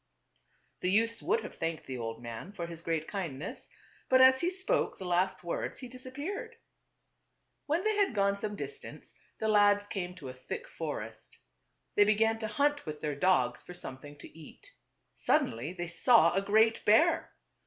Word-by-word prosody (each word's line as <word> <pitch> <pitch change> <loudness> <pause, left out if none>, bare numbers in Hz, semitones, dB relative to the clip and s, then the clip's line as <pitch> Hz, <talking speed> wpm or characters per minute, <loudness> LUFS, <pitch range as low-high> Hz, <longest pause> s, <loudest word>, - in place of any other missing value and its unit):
The 180 - -1
youths 225 +3 +2
would 450 +6 +1
have - - -8
thanked 165 -1 -4
the 130 -2 -5
old 115 0 -5
mail 115 - -7
for 170 -4 -4
his 170 -1 -8
great 165 -2 -2
kindness, 170 -6 -5 0.4
but 260 - +6
as 260 0 +7
he 345 - +2
spoke 380 +7 0
the 190 - -7
last 180 +2 0
words 170 - -3
he 255 - -7
disappeared. 285 - -6 1.1
When 320 +5 +1
they 435 0 +1
had 395 - +2
gone 200 0 +2
some 205 +1 -4
distance 430 - -8 0.2
the 220 - -2
lads 205 -1 +4
came 180 -3 -5
to 135 -6 -8
a - - -7
thick 130 - -7
forest. - - -7 0.6
They 205 - +6
began 220 +2 +2
to 220 - -3
hunt 290 - 0
with 150 -1 -5
their 150 -2 -2
dogs 140 -7 +2
for 180 - -11
something 145 -2 -9
to 145 - -13
eat. 160 -2 -14 0.4
Suddenly 120 +8 0
they 175 -1 -5
saw 225 +8 +5
a 195 - +2
great 220 +3 +3
bear. 315 +11 +3
200 Hz, 175 wpm, -31 LUFS, 165-255 Hz, 1.1 s, as